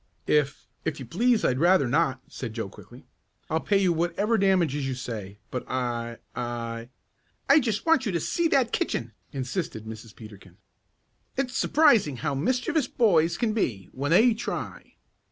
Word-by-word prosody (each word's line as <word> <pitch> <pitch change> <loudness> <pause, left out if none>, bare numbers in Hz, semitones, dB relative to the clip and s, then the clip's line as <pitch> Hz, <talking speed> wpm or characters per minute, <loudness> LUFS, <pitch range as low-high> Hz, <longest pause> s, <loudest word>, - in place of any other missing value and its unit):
"If 145 -2 +1 0.2
if 160 -3 -3
you 130 - -6
please 230 - +2
I'd 130 0 +1
rather 175 -4 +4
not," 135 -1 +1
said 115 -4 -7
Joe 110 -4 -3
quickly. - - -14 0.5
"I'll 160 - +2
pay 200 +4 +2
you 190 -3 +3
whatever 175 +7 0
damages 175 -9 +2
you 130 - -2
say, 105 -6 -6
but 125 - -3
I 120 -2 -2 0.2
I 115 -1 -4 0.3
" - - -43
"I 280 +3 +8
just 225 -6 -1
want 320 -6 +3
you - - 0
to 170 - 0
see 340 - 0
that 265 -7 +2
kitchen!" 115 0 -1 0.2
insisted 130 - -4
Mrs. 110 0 -9
Peterkin. 100 -5 -13 0.8
"It's 265 -1 -1
surprising 230 - +4
how - - -2
mischievous 250 - 0
boys 175 -7 +3
can 225 -3 0
be 105 - -2
when 140 +2 -2
they 225 +8 +6
try." 220 - -6
150 Hz, 165 wpm, -26 LUFS, -, 0.8 s, I